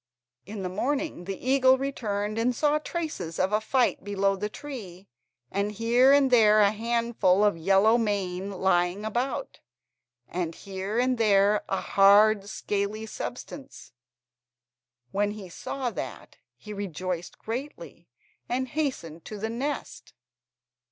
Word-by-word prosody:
In 205 -1 -6
the - - -1
morning 260 - -2
the 195 0 -4
eagle 260 0 +4
returned 215 -6 -3
and 245 +2 +1
saw 300 +2 +2
traces 305 - -5
of 190 +2 0
a 215 - +2
fight 250 +3 +1
below 200 -1 +1
the 210 +2 -3
tree, 205 -9 -9 0.4
and 200 +2 -1
here 235 +5 +4
and 280 -2 +4
there 215 -3 +6
a 200 -1 +5
handful 225 -3 +1
of 205 -3 +3
yellow 195 +7 +4
mane 195 -3 -2
lying 190 +1 +1
about, 240 +3 -3 0.7
and 170 -2 -3
here 195 +2 -5
and 250 0 +1
there 205 -1 +4
a 195 - 0
hard 200 +1 +5
scaly 205 +2 -3
substance; 265 +5 -8 1.2
when 205 +1 0
he 200 -4 -9
saw 250 +8 -4
that - - -7 0.2
he 210 - -9
rejoiced 185 -3 -4
greatly, 255 +6 -7 0.4
and 255 +1 -1
hastened 235 - -3
to 215 - -7
the 220 +2 -3
nest. 270 +3 -5
210 Hz, 130 wpm, -27 LUFS, 195-245 Hz, 1.2 s, there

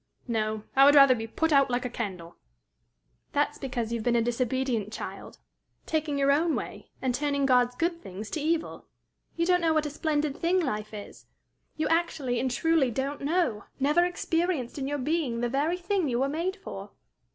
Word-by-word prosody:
No; 215 -2 -1
I 270 - +7
would 285 +1 +7
rather 275 -2 +8
be 225 -2 -4
put 320 +7 0
out 275 -1 +5
like 245 0 -1
a - - +1
candle." 185 -8 -6 1.0
"That's - - 0
because 245 -4 -3
you 235 - -1
have - - -5
been 240 0 +2
a 235 - +3
disobedient 240 -2 -1
child, - - -7 0.5
taking 310 -2 -1
your 280 0 +3
own 315 +3 +2
way, - - -6
and 255 -1 +1
turning 280 +1 0
God's 250 -2 +3
good 335 +4 -1
things 195 +3 -8
to 315 - -2
evil. 325 +2 -2 0.5
You 335 - +1
don't 360 0 +3
know 325 -1 +2
what 310 -1 +2
a 295 - -3
splendid 300 -1 -1
thing 350 +4 +1
life 215 - -2
is. 210 -2 -10 0.5
You 310 - 0
actually 320 -7 0
and 260 +2 0
truly 315 +1 +2
don't 270 +5 -3
know, 285 - 0
never 300 +6 +3
experienced 335 -6 -1
in 270 - -2
your 290 +1 -1
being 280 -4 -1
the 240 - 0
very 295 +7 0
thing 360 -3 0
you 240 0 0
were 275 - +1
made 340 +6 -2
for." 200 - -9
275 Hz, 195 wpm, -28 LUFS, 240-320 Hz, 1.0 s, rather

